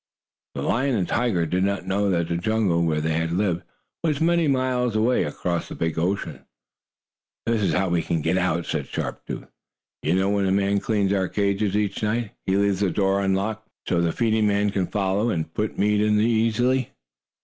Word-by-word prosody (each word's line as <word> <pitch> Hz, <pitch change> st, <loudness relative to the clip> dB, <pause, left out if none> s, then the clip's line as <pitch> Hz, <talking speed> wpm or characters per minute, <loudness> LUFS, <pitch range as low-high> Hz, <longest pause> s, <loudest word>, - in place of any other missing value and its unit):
The -, -, -3 dB
lion 130 Hz, +2 st, +1 dB
and 95 Hz, -5 st, 0 dB
tiger 115 Hz, -9 st, +1 dB
did 90 Hz, +4 st, 0 dB
not 100 Hz, -1 st, -1 dB
know 100 Hz, +1 st, +1 dB
that 85 Hz, -3 st, +1 dB
the 85 Hz, -, -1 dB
jungle, 100 Hz, -2 st, +1 dB
where 80 Hz, -2 st, +1 dB
they 80 Hz, +1 st, 0 dB
had 80 Hz, +1 st, -1 dB
lived, 90 Hz, -1 st, 0 dB, 0.4 s
was 150 Hz, -4 st, +1 dB
many 170 Hz, 0 st, +3 dB
miles 130 Hz, -3 st, +1 dB
away, 115 Hz, +4 st, +2 dB
across 85 Hz, +3 st, -2 dB
the -, -, -6 dB
big 80 Hz, 0 st, -1 dB
ocean. 95 Hz, +4 st, -2 dB, 1.0 s
"This 115 Hz, -2 st, +1 dB
is 100 Hz, -, +1 dB
how 95 Hz, 0 st, +1 dB
we 85 Hz, -1 st, +1 dB
can 80 Hz, -1 st, -2 dB
get 80 Hz, +2 st, +1 dB
out," 90 Hz, -2 st, 0 dB
said 75 Hz, -4 st, -3 dB
Sharp -, -, -4 dB
Tooth. -, -, -5 dB, 0.6 s
"You 80 Hz, +4 st, +1 dB
know 95 Hz, +1 st, +2 dB
when 100 Hz, -1 st, +1 dB
the 95 Hz, -, +1 dB
man 100 Hz, +1 st, +2 dB
cleans 100 Hz, -2 st, 0 dB
our 95 Hz, -2 st, +1 dB
cages 100 Hz, +1 st, 0 dB
each 105 Hz, -2 st, -1 dB
night, 110 Hz, 0 st, -1 dB, 0.2 s
he 95 Hz, +1 st, +2 dB
leaves 100 Hz, -1 st, +2 dB
the 100 Hz, -2 st, +2 dB
door 95 Hz, +1 st, +1 dB
unlocked 100 Hz, +3 st, -1 dB, 0.2 s
so 85 Hz, -, +2 dB
the 85 Hz, -1 st, +1 dB
feeding 110 Hz, +1 st, +1 dB
man 100 Hz, 0 st, +1 dB
can 95 Hz, -3 st, -1 dB
follow 100 Hz, +3 st, 0 dB
and 80 Hz, -5 st, -2 dB
put 105 Hz, 0 st, -2 dB
meat 105 Hz, 0 st, +2 dB
in 105 Hz, 0 st, +3 dB
easily." 115 Hz, +3 st, +2 dB
100 Hz, 200 wpm, -24 LUFS, 90-110 Hz, 1.0 s, many